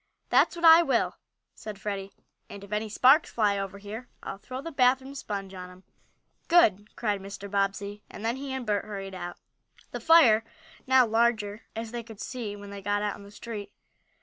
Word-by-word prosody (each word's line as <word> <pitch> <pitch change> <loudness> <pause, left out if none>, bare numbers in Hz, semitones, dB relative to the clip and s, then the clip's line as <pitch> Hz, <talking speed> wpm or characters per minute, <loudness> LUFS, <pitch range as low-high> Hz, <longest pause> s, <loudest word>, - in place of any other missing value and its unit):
"That's - - +4
what 340 0 -1
I 325 +1 +10
will," 270 -8 0 0.4
said 210 -2 -9
Freddie, 200 -1 -4 0.4
"and 200 -1 -9
if 200 - -13
any 215 +1 -1
sparks 265 +8 +5
fly 205 -3 +1
over 195 0 -5
here 210 +5 -8
I'll 195 - -6
throw 255 +4 -7
the 330 +4 -6
bath 255 -2 +4
room 265 +1 -10
sponge 200 -7 -5
on 180 -1 -8
'em!" 180 +1 -16 0.6
"Good!" 215 - +3
cried 205 -4 -1
Mr. 200 +1 -8
Bobbsey, 200 +1 -1
and 215 - -8
then, 235 +3 0
he 275 0 -6
and 265 -2 -4
Bert 210 -2 0
hurried 195 -2 -6
out. 175 -1 -6 0.5
The - - -4
fire 250 -10 +6
was 315 +4 -25
now 260 -1 +6
larger, 225 -2 +1
as 225 0 -5
they 240 0 -4
could 225 -2 -13
see 225 -5 -5
when 205 0 -10
they 200 0 -7
got 205 +1 0
out 205 -1 -1
in - - -13
the 200 - -12
street. 205 -1 -7
210 Hz, 200 wpm, -28 LUFS, 200-250 Hz, 0.6 s, I